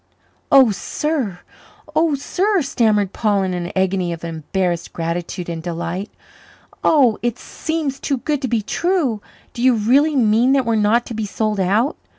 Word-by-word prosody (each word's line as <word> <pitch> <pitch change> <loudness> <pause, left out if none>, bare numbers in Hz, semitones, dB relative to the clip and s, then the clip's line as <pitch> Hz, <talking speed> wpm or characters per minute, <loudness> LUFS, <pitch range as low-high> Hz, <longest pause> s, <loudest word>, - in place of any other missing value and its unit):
"Oh, 265 -5 +7
sir! 220 - -3 0.5
oh, 315 -1 +3
sir!" 370 +6 0
stammered 215 -7 +1
Paul 205 -3 +1
in 185 -1 -2
an 175 -1 -4
agony 190 -2 0
of 170 0 -6
embarrassed 170 +2 -2
gratitude 170 +1 -4
and 165 -1 -4
delight. 170 +3 -4 0.7
"Oh, 255 -8 +4
it 240 0 -1
seems 315 -3 -4
too 275 - -1
good 290 +2 -2
to 260 - -1
be 230 -3 0
true. 305 - 0 0.3
Do 235 - -6
you 255 -1 +4
really 270 +8 +3
mean 235 +1 +3
that 270 -2 +2
we're 230 - +1
not 220 +3 +2
to - - -7
be 220 -1 -3
sold 215 0 -1
out? 210 - +1
220 Hz, 160 wpm, -20 LUFS, 185-270 Hz, 0.7 s, Oh